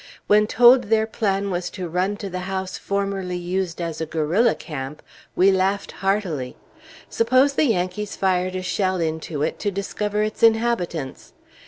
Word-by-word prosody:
When 210 Hz, 0 st, +4 dB
told 245 Hz, +3 st, +6 dB
their 220 Hz, +1 st, +2 dB
plan 200 Hz, -3 st, -1 dB
was 175 Hz, 0 st, -2 dB
to 180 Hz, -2 st, -4 dB
run 185 Hz, +5 st, -1 dB
to 205 Hz, -, -6 dB
the 185 Hz, -, -3 dB
house 190 Hz, -1 st, -3 dB
formerly 195 Hz, -2 st, -2 dB
used 180 Hz, 0 st, -3 dB
as 165 Hz, -2 st, -4 dB
a 160 Hz, -, -2 dB
guerrilla 165 Hz, +10 st, +2 dB
camp, 145 Hz, -1 st, -7 dB, 0.3 s
we 190 Hz, +2 st, +5 dB
laughed 195 Hz, +1 st, 0 dB
heartily. 190 Hz, -10 st, -2 dB, 0.5 s
Suppose 255 Hz, +5 st, +3 dB
the 300 Hz, -, +2 dB
Yankees 200 Hz, -2 st, -1 dB
fired 185 Hz, -1 st, 0 dB
a 185 Hz, -, -3 dB
shell 185 Hz, 0 st, 0 dB
into 160 Hz, -2 st, -2 dB
it -, -, -2 dB
to 205 Hz, -, -1 dB
discover 205 Hz, +2 st, -2 dB
its 215 Hz, 0 st, -4 dB
inhabitants? 220 Hz, -, +1 dB
190 Hz, 160 wpm, -22 LUFS, 175-210 Hz, 0.5 s, told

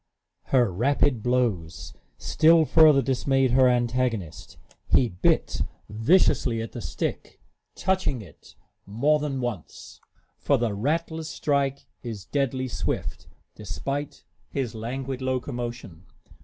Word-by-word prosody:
Her 120 Hz, -7 st, +2 dB
rapid 125 Hz, +3 st, +1 dB
blows 105 Hz, -, -1 dB, 0.2 s
still 160 Hz, +1 st, +4 dB
further 155 Hz, -3 st, +6 dB
dismayed 135 Hz, 0 st, +1 dB
her 130 Hz, +1 st, +5 dB
antagonist. 120 Hz, -7 st, -1 dB, 0.3 s
He 125 Hz, -, +3 dB
bit 90 Hz, -2 st, 0 dB, 0.3 s
viciously 115 Hz, -, +2 dB
at 115 Hz, 0 st, -5 dB
the -, -, -7 dB
stick, -, -, -4 dB, 0.4 s
touching 185 Hz, -8 st, 0 dB
it 85 Hz, -7 st, -17 dB, 0.3 s
more 140 Hz, +10 st, +2 dB
than 140 Hz, -3 st, -3 dB
once; 115 Hz, -9 st, -6 dB, 0.4 s
for 140 Hz, -, +2 dB
the 120 Hz, -3 st, -1 dB
rattler's 160 Hz, +7 st, -2 dB
strike 140 Hz, -1 st, -1 dB, 0.2 s
is 110 Hz, -6 st, -7 dB
deadly 130 Hz, 0 st, -1 dB
swift, 100 Hz, -7 st, -4 dB, 0.3 s
despite 135 Hz, +9 st, -5 dB, 0.3 s
his 130 Hz, -5 st, -3 dB
languid 130 Hz, +4 st, -5 dB
locomotion. 120 Hz, -, -4 dB
125 Hz, 110 wpm, -25 LUFS, 115-140 Hz, 0.4 s, further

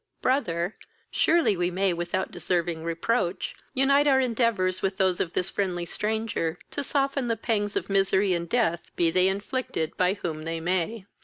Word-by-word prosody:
Brother, 185 Hz, -9 st, 0 dB, 0.3 s
surely 335 Hz, -11 st, +3 dB
we 175 Hz, 0 st, 0 dB
may, 190 Hz, +1 st, +1 dB
without 175 Hz, +2 st, -2 dB
deserving 170 Hz, -2 st, -1 dB
reproach, 170 Hz, +3 st, -1 dB, 0.2 s
unite 275 Hz, +2 st, +4 dB
our 270 Hz, -2 st, +5 dB
endeavours 230 Hz, -7 st, +1 dB
with 190 Hz, 0 st, -1 dB
those 190 Hz, -3 st, +2 dB
of 170 Hz, -, -1 dB
this 180 Hz, -, 0 dB
friendly 180 Hz, -3 st, -1 dB
stranger, 210 Hz, -5 st, -2 dB
to 285 Hz, -, -2 dB
soften 275 Hz, -2 st, 0 dB
the 230 Hz, -1 st, 0 dB
pangs 205 Hz, -2 st, -1 dB
of -, -, -1 dB
misery 195 Hz, 0 st, +2 dB
and 170 Hz, -1 st, -2 dB
death, 215 Hz, -9 st, +1 dB
be 170 Hz, -1 st, +2 dB
they 185 Hz, +2 st, +4 dB
inflicted 200 Hz, -4 st, -2 dB
by 185 Hz, +1 st, +2 dB
whom 160 Hz, -6 st, -4 dB
they 165 Hz, +1 st, -3 dB
may." 185 Hz, +5 st, -1 dB
190 Hz, 165 wpm, -26 LUFS, 175-230 Hz, 0.3 s, our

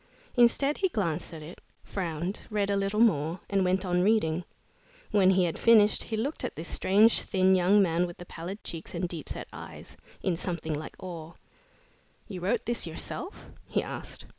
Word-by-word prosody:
Instead 270 Hz, +4 st, +4 dB
he 380 Hz, -, +2 dB
glanced 170 Hz, -, -2 dB
at 160 Hz, -2 st, -8 dB
it, 165 Hz, +4 st, -11 dB, 0.2 s
frowned, 175 Hz, +1 st, -4 dB
read 205 Hz, -2 st, 0 dB
a -, -, +2 dB
little 200 Hz, +2 st, 0 dB
more, 170 Hz, -6 st, +3 dB
and 195 Hz, -1 st, +3 dB
went 185 Hz, +1 st, +1 dB
on 180 Hz, -1 st, +1 dB
reading. 180 Hz, -5 st, +2 dB, 0.7 s
When 195 Hz, -3 st, +5 dB
he 190 Hz, -1 st, +4 dB
had 170 Hz, -2 st, -1 dB
finished, 215 Hz, -3 st, +5 dB
he 220 Hz, -, -3 dB
looked 275 Hz, +8 st, -2 dB
at -, -, -3 dB
this 165 Hz, +2 st, -6 dB
strange, 210 Hz, +4 st, +4 dB
thin 190 Hz, -1 st, +3 dB
young 190 Hz, +3 st, +5 dB
man 175 Hz, 0 st, +1 dB
with 175 Hz, -, -10 dB
the 175 Hz, -, -9 dB
pallid 175 Hz, +5 st, -7 dB
cheeks 165 Hz, +1 st, -7 dB
and 175 Hz, +1 st, -1 dB
deep 170 Hz, -4 st, -7 dB
set -, -, -5 dB
eyes, -, -, -10 dB, 0.3 s
in 185 Hz, -, +1 dB
something 165 Hz, -2 st, -3 dB
like 150 Hz, +1 st, -6 dB
awe. 170 Hz, -3 st, -7 dB, 0.9 s
"You 185 Hz, -4 st, -7 dB
wrote 215 Hz, +6 st, 0 dB
this 240 Hz, -6 st, -1 dB
yourself?" 265 Hz, -, -6 dB, 0.2 s
he -, -, 0 dB
asked. -, -, -7 dB
185 Hz, 185 wpm, -28 LUFS, 170-210 Hz, 0.9 s, When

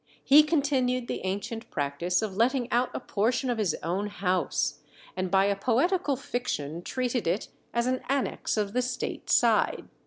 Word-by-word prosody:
He 290 Hz, +2 st, +8 dB
continued 270 Hz, -5 st, +1 dB
the -, -, -4 dB
ancient 220 Hz, +5 st, -4 dB
practice 150 Hz, +7 st, -1 dB
of 205 Hz, -3 st, -3 dB
letting 245 Hz, +3 st, +1 dB
out 245 Hz, +1 st, +2 dB
a -, -, -1 dB
portion 245 Hz, +3 st, 0 dB
of 235 Hz, -, -2 dB
his 195 Hz, -7 st, +1 dB
own 190 Hz, +5 st, -1 dB
house, 180 Hz, -7 st, -1 dB, 0.4 s
and 185 Hz, 0 st, -2 dB
by 195 Hz, +1 st, +4 dB
a 200 Hz, 0 st, +2 dB
poetical 280 Hz, -, +1 dB
fiction 175 Hz, -, -3 dB
treated 245 Hz, +1 st, -2 dB
it 180 Hz, +6 st, -1 dB, 0.2 s
as 235 Hz, 0 st, 0 dB
an 255 Hz, 0 st, 0 dB
annexe 275 Hz, -4 st, -1 dB
of 205 Hz, -1 st, -1 dB
the 250 Hz, -, +2 dB
state 250 Hz, 0 st, -4 dB
side. -, -, +3 dB
235 Hz, 165 wpm, -28 LUFS, 190-255 Hz, 0.4 s, He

